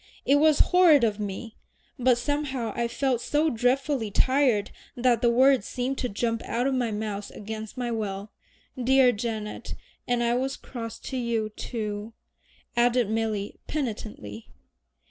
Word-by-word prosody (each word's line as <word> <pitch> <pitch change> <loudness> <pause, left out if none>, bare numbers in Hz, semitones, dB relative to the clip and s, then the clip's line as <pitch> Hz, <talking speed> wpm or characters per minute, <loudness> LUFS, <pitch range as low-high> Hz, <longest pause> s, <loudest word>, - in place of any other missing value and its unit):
It 280 - +5
was 305 0 +4
horrid 335 -7 +7
of 215 -2 +1
me, 210 +2 -5 0.4
but 250 -1 +4
somehow 265 -3 -2
I 235 -1 0
felt 255 0 0
so 300 +4 +1
dreadfully 250 0 +1
tired 255 -2 +2 0.3
that 240 -2 +3
the 240 - +4
words 255 -1 +4
seemed 255 +2 -2
to 250 - -1
jump 230 +2 -1
out 240 +2 -1
of 275 - +1
my 250 -3 0
mouth 210 -1 -4
against 220 +2 -7
my 245 -1 -2
will. 205 -2 -4 0.5
Dear 260 0 +5
Janet 215 -1 -4 0.3
and 245 -1 +1
I 235 0 +2
was 265 +2 -1
cross 230 -3 -7
to 265 - -5
you, 230 -3 -1
too," 215 0 -5 0.6
added 240 -2 +3
Milly 220 -2 -2
penitently. 210 - -5
235 Hz, 145 wpm, -26 LUFS, 215-260 Hz, 0.6 s, horrid